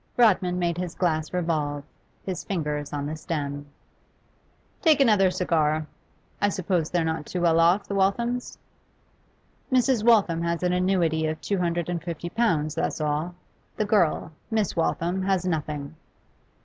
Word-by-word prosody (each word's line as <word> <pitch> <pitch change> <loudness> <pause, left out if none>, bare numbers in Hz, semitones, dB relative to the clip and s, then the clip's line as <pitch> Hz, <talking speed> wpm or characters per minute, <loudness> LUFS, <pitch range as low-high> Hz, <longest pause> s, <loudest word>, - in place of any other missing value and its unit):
Rodman 185 -6 +4
made 175 -1 -1
his 180 -2 -4
glass 155 -4 0
revolve, 155 -5 -1 0.4
his 185 -2 -4
fingers 150 -6 -3
on 145 -1 -3
the 155 +2 -3
stem. 145 -3 -4 1.1
'Take 315 -3 +5
another 210 -8 +5
cigar. 155 -4 +1 0.6
I 205 - +3
suppose 180 -4 -1
they're 175 -2 0
not 160 -2 -2
too 180 - -3
well 165 -1 +4
off, 175 +5 +3
the - - -4
Walthams?' 235 +6 0 1.1
'Mrs. 255 -3 +3
Waltham 205 -8 +4
has 170 +1 -1
an 180 0 +2
annuity 175 -4 +1
of 155 0 -3
two 200 -2 -2
hundred 170 -1 -1
and 175 -2 -3
fifty 170 0 -5
pounds, 160 -10 +1
that's 165 - -2
all. 155 +3 -1 0.4
The 215 - +1
girl 180 -6 +2 0.2
Miss 220 -3 0
Waltham 170 +2 0
has 190 -1 0
nothing. 150 -3 -3
175 Hz, 150 wpm, -25 LUFS, 155-195 Hz, 1.1 s, Take